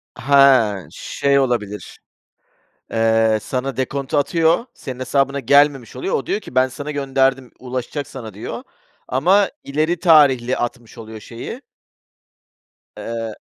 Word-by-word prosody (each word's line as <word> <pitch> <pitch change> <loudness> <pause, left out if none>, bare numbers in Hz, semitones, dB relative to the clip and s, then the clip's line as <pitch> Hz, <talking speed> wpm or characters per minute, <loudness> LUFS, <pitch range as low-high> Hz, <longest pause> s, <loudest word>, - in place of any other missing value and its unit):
Ha. 130 -8 +4
Şey 140 0 0
olabilir: 105 -7 -3 0.9
Eee, 110 -1 +2
sana 135 +1 -3
dekontu 135 +3 -2
atıyor, 165 +7 +2
senin 130 -1 -8
hesabına 140 +2 0
gelmemiş 140 -2 +3
oluyor. - - -3
O, 135 - -1
diyor 205 - -1
ki, 130 - -13
"Ben 130 0 +3
sana 145 +3 -7
gönderdim, 135 -2 0
ulaşacak 130 +3 -5
sana." 115 -6 -9
diyor. 105 - -6 0.5
Ama 185 +10 +3
ileri 155 +4 -1
tarihli 140 -8 +4
atmış 120 -1 -5
oluyor 110 -1 -9
şeyi. 115 +2 -8 1.4
Eee. 115 -1 -5
130 Hz, 120 wpm, -20 LUFS, 115-140 Hz, 1.4 s, Ha